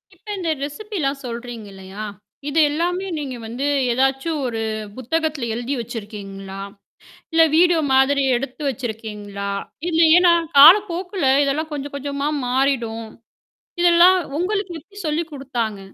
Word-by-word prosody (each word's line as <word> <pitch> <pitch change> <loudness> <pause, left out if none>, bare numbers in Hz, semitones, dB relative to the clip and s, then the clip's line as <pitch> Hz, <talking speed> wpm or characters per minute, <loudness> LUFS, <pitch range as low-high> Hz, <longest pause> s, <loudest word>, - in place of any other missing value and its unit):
இப்ப - - -32
இந்த 345 -3 -2
ரெசிபிலாம் 295 -3 -3
சொல்றீங்க 235 -2 -6
இல்லையா? 190 +2 -10 0.5
இது 320 +3 +1
எல்லாமே 350 +5 -1
நீங்க 275 -4 -4
வந்து 245 +5 -4 0.3
ஏதாச்சும் 270 +5 0
ஒரு 230 -2 -3 0.4
புத்தகத்தில 295 0 -2
எழுதி 240 +4 -3
வச்சிருக்கீங்களா? 200 -4 -8 0.7
இல்ல 325 0 +5
வீடியோ 345 -1 +5
மாதிரி 275 +1 +4
எடுத்து 265 +4 -6
வச்சிருக்கீங்களா? 210 -4 -6 0.4
இல்ல 325 - +1 0.2
ஏன்னா 355 -1 +5 0.3
காலப்போக்குல 360 +1 +6 0.2
இதெல்லாம் 310 +3 -1
கொஞ்சம் 285 -1 -5
கொஞ்சமா 280 +1 -3 0.2
மாறிடும். 245 -3 0 0.8
இதெல்லாம் 350 +2 +6 0.2
உங்களுக்கு 390 0 -1
எப்டி 400 +5 -20
சொல்லி 310 +3 0
குடுத்தாங்க? 240 -7 -3
275 Hz, 115 wpm, -21 LUFS, 235-330 Hz, 0.8 s, காலப்போக்குல